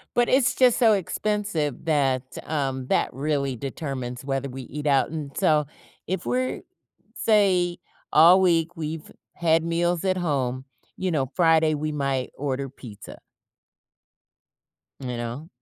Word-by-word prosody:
But 240 Hz, 0 st, +3 dB
it's 265 Hz, -1 st, +3 dB
just 250 Hz, -3 st, +4 dB
so 225 Hz, -3 st, +5 dB
expensive 195 Hz, -, -1 dB
that, 135 Hz, -5 st, +1 dB, 0.2 s
um 135 Hz, -4 st, -2 dB
that -, -, +1 dB
really 140 Hz, -1 st, -1 dB
determines 130 Hz, -2 st, -5 dB
whether 135 Hz, 0 st, -2 dB
we 130 Hz, 0 st, -7 dB
eat 150 Hz, +4 st, -7 dB
out. 140 Hz, 0 st, +3 dB
And 150 Hz, -4 st, -6 dB
so, 155 Hz, -6 st, +3 dB, 0.4 s
if 190 Hz, +2 st, -3 dB
we're 255 Hz, +1 st, -1 dB, 0.5 s
say, 185 Hz, -5 st, +2 dB, 0.3 s
all 170 Hz, +5 st, +7 dB
week 170 Hz, -1 st, +2 dB
we've 155 Hz, 0 st, -5 dB, 0.2 s
had 165 Hz, -1 st, +2 dB
meals 170 Hz, +1 st, 0 dB
at 185 Hz, -1 st, +1 dB
home, 135 Hz, -7 st, -1 dB, 0.3 s
you 185 Hz, -1 st, -2 dB
know, 135 Hz, -5 st, -1 dB
Friday 160 Hz, -3 st, +4 dB
we 155 Hz, +1 st, -2 dB
might 135 Hz, -3 st, -2 dB
order 135 Hz, -1 st, -2 dB
pizza. 120 Hz, -6 st, -11 dB, 1.8 s
You 125 Hz, -2 st, -4 dB
know? 120 Hz, +7 st, -5 dB
155 Hz, 135 wpm, -25 LUFS, 135-175 Hz, 1.8 s, all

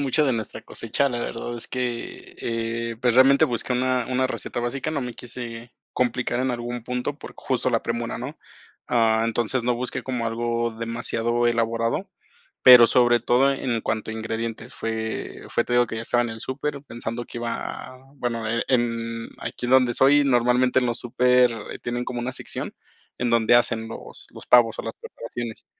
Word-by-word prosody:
mucho 145 Hz, +2 st, +2 dB
de 130 Hz, -, +2 dB
nuestra 110 Hz, -2 st, -4 dB
cosecha, 115 Hz, +5 st, -1 dB
la 120 Hz, -, -2 dB
verdad 120 Hz, -, -4 dB
es 115 Hz, -, -4 dB
que, 125 Hz, -2 st, -4 dB
eh, 115 Hz, 0 st, -3 dB
pues, 125 Hz, -1 st, +2 dB
realmente 135 Hz, +4 st, +6 dB
busqué 125 Hz, -2 st, -1 dB
una 125 Hz, -1 st, +1 dB
una 130 Hz, +1 st, +1 dB
receta 130 Hz, -, -4 dB
básica, 130 Hz, +5 st, -2 dB
no 140 Hz, -4 st, -2 dB
me 125 Hz, -1 st, -4 dB
quise 120 Hz, -1 st, -8 dB, 0.2 s
complicar 125 Hz, 0 st, 0 dB
en 130 Hz, -, +1 dB
algún 120 Hz, -1 st, -4 dB
punto 125 Hz, +4 st, -3 dB
por -, -, -10 dB
justo 130 Hz, -1 st, -1 dB
la 115 Hz, -2 st, +1 dB
premura, 115 Hz, 0 st, -3 dB
¿no?, -, -, -7 dB, 0.5 s
ah, 115 Hz, -1 st, +3 dB
entonces, 120 Hz, +2 st, 0 dB
no 125 Hz, -1 st, +2 dB
busqué 125 Hz, +1 st, -3 dB
como 125 Hz, -3 st, -2 dB
algo 115 Hz, +1 st, -1 dB
demasiado 115 Hz, +1 st, -1 dB
elaborado, 115 Hz, 0 st, 0 dB, 0.5 s
pero 125 Hz, -2 st, +10 dB
sobre 120 Hz, -1 st, +4 dB
todo 130 Hz, +4 st, +4 dB
e -, -, -6 dB
en 120 Hz, -3 st, 0 dB
cuanto 110 Hz, 0 st, -2 dB
a -, -, -4 dB
ingredientes. 115 Hz, +1 st, -4 dB
Fue 110 Hz, 0 st, -4 dB
fue 120 Hz, -, +1 dB
te -, -, -7 dB
digo 120 Hz, -1 st, +4 dB
que 115 Hz, -, -5 dB
ya 110 Hz, -, -3 dB
estaba 120 Hz, +1 st, +1 dB
en 120 Hz, -, -3 dB
el 110 Hz, 0 st, -8 dB
súper, 140 Hz, +1 st, -4 dB
pensando 120 Hz, -2 st, -5 dB
que 120 Hz, -, -9 dB
iba 120 Hz, 0 st, -2 dB, 0.4 s
a -, -, -15 dB, 0.2 s
bueno, 115 Hz, -3 st, -2 dB
e 115 Hz, +1 st, 0 dB
en 115 Hz, -2 st, -1 dB
aquí 120 Hz, -, -5 dB
donde 130 Hz, -1 st, +4 dB
soy, 145 Hz, +3 st, +5 dB
normalmente 125 Hz, 0 st, +3 dB
en 125 Hz, -, 0 dB
los 120 Hz, -, -1 dB
súper 125 Hz, -2 st, +2 dB
tienen 120 Hz, +1 st, -2 dB
como 125 Hz, -1 st, -4 dB
una 125 Hz, +2 st, -3 dB
sección, -, -, -4 dB, 0.4 s
en 120 Hz, -1 st, 0 dB
donde 115 Hz, 0 st, +4 dB
hacen 115 Hz, -2 st, +2 dB
los 115 Hz, -, -9 dB
los -, -, -11 dB
pavos 120 Hz, -2 st, +5 dB
o -, -, 0 dB
las 115 Hz, -, -6 dB
preparaciones. 115 Hz, 0 st, -7 dB
120 Hz, 190 wpm, -24 LUFS, 115-125 Hz, 0.5 s, pero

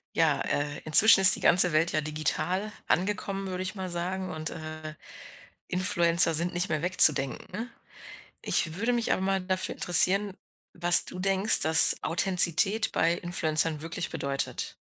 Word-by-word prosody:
Ja, -, -, -1 dB
äh, 145 Hz, 0 st, -5 dB
inzwischen 195 Hz, +6 st, +7 dB
ist 190 Hz, -, +7 dB
die -, -, -10 dB
ganze 180 Hz, -1 st, +4 dB
Welt 160 Hz, +2 st, -1 dB
ja 155 Hz, -, -3 dB
digital 155 Hz, +7 st, -5 dB, 0.2 s
angekommen, 195 Hz, 0 st, -4 dB
würde 185 Hz, 0 st, -7 dB
ich 185 Hz, -, -8 dB
mal 190 Hz, -2 st, -8 dB
sagen 185 Hz, +2 st, -7 dB
und, 155 Hz, -1 st, -7 dB
äh, 155 Hz, -1 st, -11 dB, 0.7 s
Influencer 170 Hz, -2 st, +1 dB
sind 170 Hz, +3 st, -3 dB
nicht 175 Hz, +2 st, -3 dB
mehr 155 Hz, -2 st, -4 dB
wegzudenken. 180 Hz, -, +1 dB, 0.7 s
Ich 160 Hz, -2 st, -2 dB
würde 230 Hz, +6 st, -4 dB
mich 240 Hz, -2 st, -3 dB
aber -, -, -6 dB
mal 190 Hz, 0 st, -3 dB
dafür 185 Hz, 0 st, -4 dB
interessieren, 195 Hz, +3 st, +1 dB, 0.4 s
was 175 Hz, 0 st, +4 dB
du 180 Hz, -, -11 dB
denkst, 195 Hz, +2 st, +2 dB
dass 160 Hz, +2 st, +6 dB
Authentizität 190 Hz, +4 st, 0 dB
bei 165 Hz, +1 st, -2 dB
Influencern 160 Hz, -3 st, -2 dB
wirklich 165 Hz, +1 st, -7 dB
bedeutet. 140 Hz, -3 st, -6 dB
175 Hz, 150 wpm, -24 LUFS, 155-190 Hz, 0.7 s, inzwischen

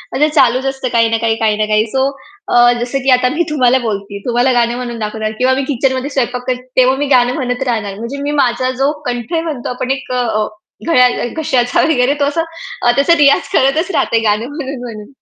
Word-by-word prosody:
असं 300 Hz, +2 st, +3 dB
चालूच 255 Hz, -2 st, +3 dB
असतं 270 Hz, -1 st, -2 dB
काही 230 Hz, -1 st, +3 dB
ना 225 Hz, -, +1 dB
काही, 225 Hz, 0 st, 0 dB
काही 220 Hz, -2 st, 0 dB
ना 215 Hz, -, +1 dB
काही, 215 Hz, 0 st, +2 dB
सो 265 Hz, 0 st, +1 dB, 0.4 s
अ, 240 Hz, 0 st, +5 dB
जसं 245 Hz, +3 st, -2 dB
की 270 Hz, -, +1 dB
आता 250 Hz, 0 st, +1 dB
मी 345 Hz, -, +2 dB
तुम्हाला 260 Hz, -4 st, +3 dB
बोलते 200 Hz, -1 st, -4 dB
तुम्हाला 245 Hz, +2 st, +2 dB
गाणं 235 Hz, 0 st, +1 dB
म्हणून 240 Hz, -2 st, -5 dB
दाखवणार 215 Hz, 0 st, -3 dB
किंवा 255 Hz, +1 st, +3 dB
मी 270 Hz, +1 st, -1 dB
किचनमध्ये 260 Hz, +2 st, -1 dB
स्वयंपाक 250 Hz, -3 st, -2 dB
करते 250 Hz, -1 st, -1 dB, 0.2 s
तेव्हा 260 Hz, +1 st, +4 dB
मी 290 Hz, +1 st, -1 dB
गाणं 245 Hz, 0 st, +3 dB
म्हणत 250 Hz, -2 st, -2 dB
राहणार 215 Hz, -5 st, -2 dB
म्हणजे 235 Hz, +5 st, -5 dB
मी 290 Hz, +1 st, -2 dB
माझा 255 Hz, +1 st, 0 dB
जो 280 Hz, -, +3 dB
कंठ 245 Hz, +1 st, -4 dB
म्हणतो 300 Hz, -7 st, -4 dB
आपण 250 Hz, +1 st, -3 dB
एक 270 Hz, -, -10 dB
अ, 225 Hz, -4 st, 0 dB, 0.4 s
घळ्या 250 Hz, -6 st, +5 dB, 0.2 s
घश्याचा 250 Hz, -3 st, 0 dB
वगैरे 270 Hz, -3 st, +2 dB
तो 285 Hz, -, +2 dB
असा 295 Hz, +4 st, 0 dB, 0.4 s
अ, 240 Hz, -, +4 dB
त्याचा 280 Hz, +5 st, +4 dB
रियाज 285 Hz, -2 st, +3 dB
करतच 310 Hz, +8 st, +2 dB
राहत 315 Hz, -, 0 dB
गाणं 210 Hz, +1 st, +1 dB
म्हणून 275 Hz, -3 st, -5 dB
म्हणून. 215 Hz, -4 st, -8 dB
250 Hz, 210 wpm, -15 LUFS, 235-270 Hz, 0.4 s, अ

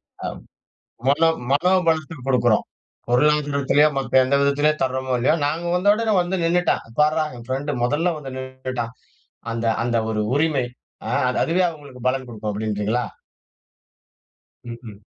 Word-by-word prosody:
அ -, -, -10 dB
அ -, -, -1 dB, 0.8 s
மனோ 160 Hz, +4 st, +4 dB, 0.2 s
மனோபலத்தை 160 Hz, 0 st, +2 dB
கொடுக்கிறோம். 120 Hz, -4 st, +3 dB, 0.5 s
பொருளாதாரத்திலையோ, 145 Hz, +2 st, +3 dB
மத்த 130 Hz, -1 st, +3 dB
எந்த 130 Hz, +2 st, 0 dB
விதத்திலேயோ 145 Hz, +2 st, +2 dB
தர்றோமோ 130 Hz, -1 st, -1 dB
இல்லையோ, 130 Hz, +6 st, +3 dB
"நாங்க 160 Hz, +4 st, -1 dB
வந்த 185 Hz, +3 st, +3 dB
உடனே 220 Hz, 0 st, 0 dB
வந்து 180 Hz, +2 st, -1 dB
நின்னுட்டா! 175 Hz, +1 st, +2 dB, 0.2 s
பாருடா 155 Hz, +1 st, +3 dB
என் 120 Hz, -1 st, -11 dB
பிரெண்ட்டு 140 Hz, +3 st, -2 dB
மொதல்ல 150 Hz, +8 st, +1 dB
வந்து 135 Hz, -3 st, -7 dB
நின்னுட்டான்" 130 Hz, -2 st, -5 dB, 0.6 s
அந்த 115 Hz, 0 st, -2 dB, 0.2 s
அந்த 120 Hz, -1 st, 0 dB
ஒரு 105 Hz, -1 st, 0 dB
உரிமை 145 Hz, -3 st, +1 dB, 0.4 s
அ -, -, -2 dB, 0.2 s
அது 125 Hz, -, -1 dB
அதுவே 180 Hz, +3 st, +2 dB
அவுங்களுக்கு 145 Hz, -6 st, -10 dB
பலன் 130 Hz, 0 st, -1 dB
குடுக்கும் 110 Hz, -3 st, -5 dB
அப்டீன்றீங்களா? 105 Hz, +3 st, -1 dB, 1.7 s
ம்ஹ்ம். 115 Hz, -3 st, -10 dB
135 Hz, 135 wpm, -22 LUFS, 125-155 Hz, 1.7 s, மனோ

